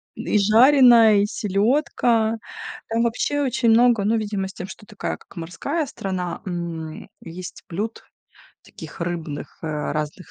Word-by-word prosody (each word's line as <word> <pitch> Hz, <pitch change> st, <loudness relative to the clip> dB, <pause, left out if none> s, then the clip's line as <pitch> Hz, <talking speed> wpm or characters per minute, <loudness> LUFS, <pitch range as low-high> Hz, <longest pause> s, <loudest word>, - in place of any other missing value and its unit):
И -, -, 0 dB
жареная, 230 Hz, 0 st, +6 dB
и -, -, +2 dB
селёдка. 225 Hz, +2 st, +1 dB, 0.5 s
Там 230 Hz, +1 st, +1 dB
вообще 245 Hz, +5 st, 0 dB
очень 245 Hz, -3 st, +1 dB
много, 230 Hz, -1 st, +5 dB
ну, 220 Hz, +3 st, +2 dB
видимо, 205 Hz, -3 st, -2 dB
с 190 Hz, -, -10 dB
тем, 180 Hz, -, -7 dB
что 210 Hz, -, -11 dB
такая 210 Hz, -1 st, -5 dB
как -, -, -20 dB
морская 180 Hz, -, -3 dB
страна, 185 Hz, -8 st, -4 dB
м, 170 Hz, -3 st, -5 dB
есть 175 Hz, +2 st, -9 dB
блюд 210 Hz, +6 st, -4 dB, 0.6 s
таких -, -, -12 dB
рыбных 165 Hz, -4 st, -5 dB
разных 155 Hz, +2 st, -4 dB
205 Hz, 135 wpm, -22 LUFS, 175-230 Hz, 0.6 s, жареная